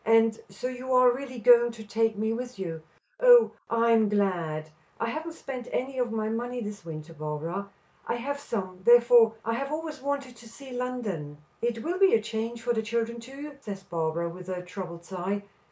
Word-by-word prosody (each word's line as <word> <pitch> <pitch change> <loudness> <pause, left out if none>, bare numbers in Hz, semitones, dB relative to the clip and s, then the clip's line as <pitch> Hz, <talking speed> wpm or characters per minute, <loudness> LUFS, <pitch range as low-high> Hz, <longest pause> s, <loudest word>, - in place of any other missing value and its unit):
"And 225 0 +4
so 195 +6 -8
you 255 +1 -5
are 255 -1 +7
really 260 -1 -7
going 240 +1 +6
to 225 -1 -9
take 225 0 +1
me 220 +1 0
with 250 +1 -5
you. 165 -4 -4 0.4
Oh, - - +8 0.2
I 230 0 +3
am 220 -2 +5
glad. 170 -7 0 0.3
I 230 - 0
haven't 320 +5 -4
spent 255 -6 -7
any 260 +1 -2
of 245 -2 0
my 220 -1 -1
money 240 +3 -2
this 210 -3 -6
winter, 160 0 -7
Barbara; 160 +6 -4 0.4
I - - 0
have 280 +4 -3
some, 185 -9 -4
therefore, 235 -1 +7
and 230 +1 0
I - - -2
have 275 +1 -3
always 310 -2 -4
wanted 275 -2 -3
to 230 0 -13
see 265 +3 -12
London." 225 -13 -3 0.2
"It 230 -1 -1
will 355 +3 -2
be 390 -7 +6
a - - +4
change 225 +1 -4
for 240 - +1
the 220 - 0
children, 230 +1 -2
too," 275 +5 -9
says 200 -4 -6
Barbara, 165 -1 -1
with 180 +2 -8
a 180 -1 -3
troubled 180 -2 -7
sigh. 190 +2 -3
230 Hz, 200 wpm, -28 LUFS, 195-250 Hz, 0.4 s, Oh